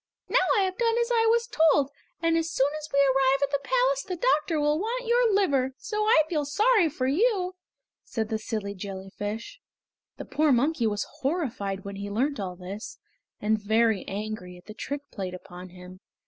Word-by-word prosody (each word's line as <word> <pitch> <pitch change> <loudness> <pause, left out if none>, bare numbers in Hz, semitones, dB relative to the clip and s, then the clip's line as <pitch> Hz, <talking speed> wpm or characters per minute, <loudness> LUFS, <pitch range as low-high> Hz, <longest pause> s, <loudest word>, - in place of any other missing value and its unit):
"Now - - +3 0.2
I - - +4
have 375 -1 -1
done 460 -1 +2
as 475 +1 0
I 455 -1 +3
was 470 +1 +2
told, 305 - +3 0.3
and 330 0 +3
as 330 0 0
soon 280 -3 +1
as 305 0 -9
we 280 - +2
arrive 270 0 +3
at 280 - 0
the 280 - +1
palace - - +2
the 380 -6 -5
doctor 325 -5 +1
will 295 +1 +2
want 480 +5 -2
your 475 0 +3
liver, 275 -10 +2
so 425 -1 -2
I 325 -8 +5
feel 310 -3 0
sorry 405 - +3
for 270 -3 -3
you!" 370 - +1 0.5
said 220 -2 -3
the 220 -1 -1
silly 215 -3 -4
jellyfish. 200 +3 -6 0.6
The - - -7
poor 305 -1 +2
monkey 255 -1 +2
was 205 -1 -1
horrified 245 - -2
when 200 0 -6
he 200 0 -5
learnt 260 +7 0
all 185 -2 -4
this, 190 +4 -8 0.4
and 215 0 +1
very 220 -1 +2
angry 200 -3 -5
at 180 - -17
the 215 - -9
trick 280 +6 -4
played 185 -3 -5
upon 180 0 -10
him. 180 +1 -12
275 Hz, 190 wpm, -27 LUFS, -, 0.6 s, I